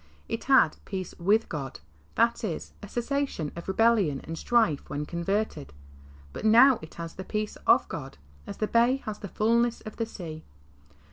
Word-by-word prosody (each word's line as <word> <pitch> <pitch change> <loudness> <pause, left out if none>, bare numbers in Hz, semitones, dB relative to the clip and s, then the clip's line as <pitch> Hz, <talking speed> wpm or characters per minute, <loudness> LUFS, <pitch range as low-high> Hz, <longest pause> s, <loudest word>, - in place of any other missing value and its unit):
'^ - - -30 0.2
It - - -4
had - - +5
"peace 185 - -5
with 205 +6 +3
God" 135 - -5 0.2
— 75 +1 -32
that 235 +1 +2
is, 175 -8 -4
a 205 - -8
cessation 240 - -2
of 170 - -8
re 190 - -2
bellion 215 -11 +3
and 165 - -6
strife 195 -7 +2
— - - -22
when 145 +1 -3
converted, 170 - -2 0.6
but - - -7
now 235 +4 +7
it 155 - -11
has 165 -1 -6
the 190 - -7
"peace 210 +2 -3
of - - +5
God," - - -7 0.3
as - - -7
the 215 - 0
bay 240 +4 +3
has 215 -1 -5
the 200 - -6
fulness 235 +3 +1
of 215 - -9
the 230 - -1
sea. 160 -7 -8
205 Hz, 195 wpm, -27 LUFS, 165-230 Hz, 0.6 s, now